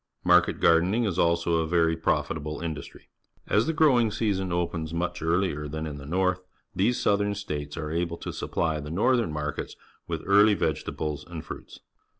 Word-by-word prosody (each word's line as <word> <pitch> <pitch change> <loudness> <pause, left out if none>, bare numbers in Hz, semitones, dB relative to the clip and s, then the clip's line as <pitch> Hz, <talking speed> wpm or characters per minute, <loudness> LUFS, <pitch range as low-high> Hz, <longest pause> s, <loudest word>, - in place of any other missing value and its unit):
Market - - +4
gardening 90 +8 +3
is 95 -5 -1
also 85 0 +2
a 80 -1 0
very 80 -1 +2
profitable 80 -1 -1
industry. 80 -3 -7 0.4
As 105 +6 +2
the - - +2
growing 140 -8 +4
season 100 -4 -1
opens 85 -2 -2
much 90 +1 -2
earlier 80 -2 0
than 80 +2 -4
in 75 -2 -6
the 70 - -10
north, 90 +2 +1 0.3
these 115 +6 +2
Southern 100 0 +1
States 75 -7 -5
are 75 -2 -4
able 85 0 -1
to - - -6
supply 80 -2 -1
the 75 0 -7
northern 115 +3 +2
markets 75 0 -4 0.3
with - - -4
early 105 +1 +5
vegetables 75 -6 -2
and 85 -3 -7
fruits. - - -9
85 Hz, 165 wpm, -27 LUFS, 80-100 Hz, 0.4 s, early